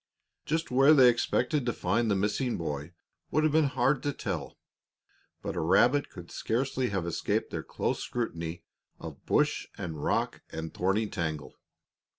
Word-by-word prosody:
Just 160 -1 -1
where 135 +4 +6
they 130 -3 +8
expected 125 +3 +1
to 120 -1 -1
find 105 +6 0
the 100 - +3
missing 105 +6 0
boy 75 -1 -4 0.4
would 155 - +2
have 155 -1 +2
been 160 -1 +5
hard 135 0 +1
to 145 - -1
tell, - - -5 0.9
but - - -3
a - - -1
rabbit 125 - +3
could 90 -2 -11
scarcely 125 +2 -1
have 95 -4 -2
escaped 85 - -1
their - - -3
close - - -2
scrutiny 85 -8 -4 0.4
of - - -9
bush - - +2
and 80 -4 -5
rock - - 0
and 80 0 -6
thorny 95 +4 +1
tangle. 80 -5 -4
115 Hz, 160 wpm, -29 LUFS, 85-135 Hz, 0.9 s, they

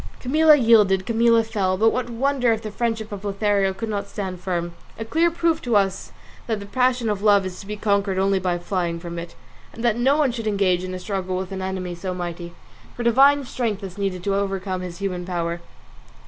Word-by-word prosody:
Camilla 305 +4 +5
yielded, 210 -7 +4
Camilla 230 0 +3
fell; 200 -4 -1
but 225 +3 +4
what 250 -1 -2
wonder 250 +1 +1
if 225 0 -1
the 215 - -5
friendship 225 -1 -2
of 200 -1 -7
Lothario 200 -1 +1
could 210 +4 -5
not 200 -2 -3
stand 190 -3 -5
firm? 175 -2 -3 0.2
A 225 - -5
clear 330 +8 +2
proof 335 -1 0
to 240 -3 0
us 195 -2 +1 0.4
that 220 -3 -1
the 200 - -8
passion 250 +3 +1
of 205 -2 -1
love 205 -2 +4
is 185 -1 -6
to 195 - -10
be 210 - -4
conquered 200 -2 0
only 195 0 +2
by 180 -1 -1
flying 175 -1 -2
from 170 0 -6
it, 170 - -9 0.4
and 230 - -9
that 235 -2 +2
no 270 +4 +3
one 290 -4 +2
should 230 -2 -5
engage 195 -3 +1
in 185 0 -5
a - - -5
struggle 185 -1 -3
with 190 0 -5
an 190 -1 -4
enemy 185 -1 -3
so 180 +1 -5
mighty; 175 -1 -6 0.4
for 240 - -4
divine 275 +4 +5
strength 225 -5 -3
is 190 0 -8
needed 190 -3 -2
to 200 - 0
overcome 195 -1 -2
his 180 -1 -7
human 185 -3 -3
power. 170 -1 -3
200 Hz, 220 wpm, -23 LUFS, 185-230 Hz, 0.4 s, Camilla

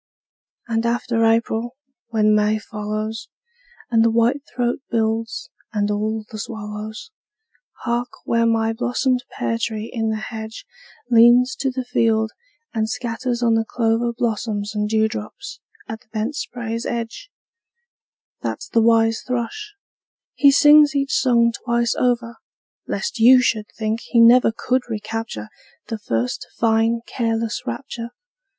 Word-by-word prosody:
And 225 0 0
after 235 0 0
April, 225 +1 +1 0.3
when 215 -2 +2
May 210 0 +3
follows, 215 +1 -5 0.6
And 225 -1 +4
the 230 - +4
whitethroat 240 +1 0
builds, 225 0 -1 0.2
and 205 -1 0
all 215 +1 -2
the 215 - -6
swallows! 215 - -7 0.7
Hark, 240 0 -1 0.2
where 230 0 +2
my 225 0 +1
blossomed 250 +2 0
pear 115 -1 -2
tree 220 -1 -3
in 225 -2 -1
the 220 - 0 0.2
hedge 220 0 -7 0.5
Leans 240 +2 +6
to 270 - 0
the 255 -1 -4
field 220 -2 +1 0.4
and 220 -2 -1
scatters 240 +1 -3
on 230 -1 +3
the 225 0 +2
clover 230 +1 0
Blossoms 220 -2 -2
and 210 -1 -1
dewdrops 220 - -2 0.3
at 220 0 -6
the - - -27
bent 225 +6 -2
spray's 235 -5 -4
edge 235 - -5 1.1
That's - - -4
the 230 - +3
wise 225 0 +3
thrush; 335 - -4 0.6
he 280 - +5
sings 295 +1 +6
each 275 -1 0
song 235 -3 +3
twice 235 -1 +1
over, 240 -2 0 0.5
Lest 470 - -3
you 250 +3 +8
should 220 -4 0
think 220 0 -1
he 235 - 0
never 235 +1 +7
could 255 +3 0
recapture 215 - -5 0.4
The 225 -2 -3
first 120 - -2
fine 225 0 +2
careless 230 -1 -2
rapture! 240 -4 -5
230 Hz, 130 wpm, -21 LUFS, 220-240 Hz, 1.1 s, you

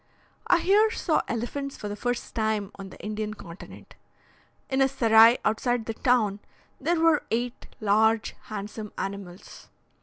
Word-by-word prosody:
I - - +5
here 420 +4 +4
saw 350 -7 0
elephants 270 +4 -4
for 210 - -6
the 205 - -4
first 245 +3 -3
time 215 -3 -1
on 195 -1 -9
the - - -13
Indian 215 0 -4
continent. 170 -2 -12 0.7
In 265 0 0
a 270 - +5
serai 230 -3 +6
outside 230 +2 0
the 225 - -3
town 220 -4 +1 0.4
there 335 +4 0
were 325 -2 +4
eight 240 +2 -3
large 220 +1 +2
handsome 210 0 -7
animals. 195 -2 -7
225 Hz, 145 wpm, -26 LUFS, 210-255 Hz, 0.7 s, serai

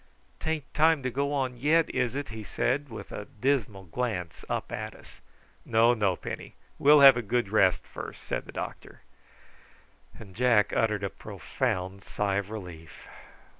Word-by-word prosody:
"Tain't 160 -3 -3
time 155 -1 +4
to 130 - -1
go 140 +3 -1
on 130 -3 -1
yet, 155 +6 +3
is 125 -1 0
it?" 145 0 -3
he 110 -1 -7
said 135 +7 -1
with 110 - -9
a 105 - -6
dismal 120 -7 0
glance 90 -2 -3
up - - -3
at - - -5
us. - - -16 0.4
"No, 115 +1 +4
no, 100 -5 +1
Penny; - - -7 0.2
we'll 145 +1 +7
have 135 -3 +10
a - - 0
good 120 -1 -1
rest 100 -3 +3
first," - - -8
said - - -3
the - - -8
doctor; - - -7 1.2
and 100 -5 -12
Jack 115 -3 +3
uttered 105 -3 +1
a 100 - -1
profound 95 +5 -3
sigh 100 -1 -1
of 100 0 -3
relief. 90 -7 -9
115 Hz, 165 wpm, -28 LUFS, 100-135 Hz, 1.2 s, have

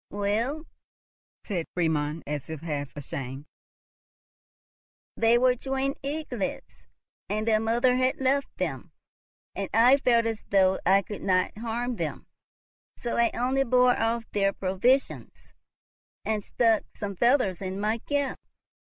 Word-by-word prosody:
"Well," 225 - -1 0.8
said 180 -6 -3
Friedmund, 160 -2 0
as 150 -1 -5
if 160 -2 -6
half 145 -4 -3
ashamed, 135 0 -6 1.7
"they 230 +1 +4
were 250 0 +4
twin 270 +2 -2
eaglets, 275 -7 -5 0.4
and 215 +2 -2
their 215 -1 +4
mother 235 +3 +2
had 255 0 +1
left 270 +1 0
them, - - -4 0.6
and 195 -1 -3
I 245 +4 +7
felt 235 -4 +3
as 225 -2 -2
though 190 -1 +3
I 195 +1 +5
could 205 +2 -7
not 185 -1 +1
harm 235 +2 -3
them; - - -4 0.7
so 240 - -3
I 235 -1 +3
only 260 +3 +1
bore 250 0 +4
off 225 +1 0
their 195 -1 +1
provisions, 195 +10 -1 0.7
and 215 -2 -1
stuck 225 -1 +2 0.2
some 200 -1 -4
feathers 235 - +2
in 190 0 -4
my 215 +3 0
cap. 285 +2 -2
225 Hz, 130 wpm, -27 LUFS, 190-250 Hz, 1.7 s, I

